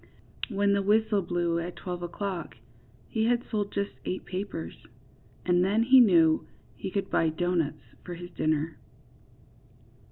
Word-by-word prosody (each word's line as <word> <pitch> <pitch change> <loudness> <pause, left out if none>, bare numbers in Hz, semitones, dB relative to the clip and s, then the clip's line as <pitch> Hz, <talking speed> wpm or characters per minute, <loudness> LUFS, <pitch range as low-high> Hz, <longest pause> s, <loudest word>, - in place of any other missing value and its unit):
When 200 -2 +2
the 200 - +2
whistle 210 +1 +3
blew 170 -1 0
at 170 +1 -5
twelve 180 -1 -5
o^clock 175 0 -4 0.5
he 220 -1 0
had 240 +1 +2
sold 205 -2 -1
just 200 0 -2
eight 185 - -4
papers, 185 - -6 0.6
and 180 0 +3
then 205 +4 +3
he 260 +2 +7
knew 170 -9 +5 0.3
he 190 - -5
could 200 +1 -3
buy 165 - +3
doughnuts 170 -1 -2
for 175 - -6
his 175 +1 -9
dinner. 155 0 -1
185 Hz, 140 wpm, -28 LUFS, 170-205 Hz, 0.6 s, he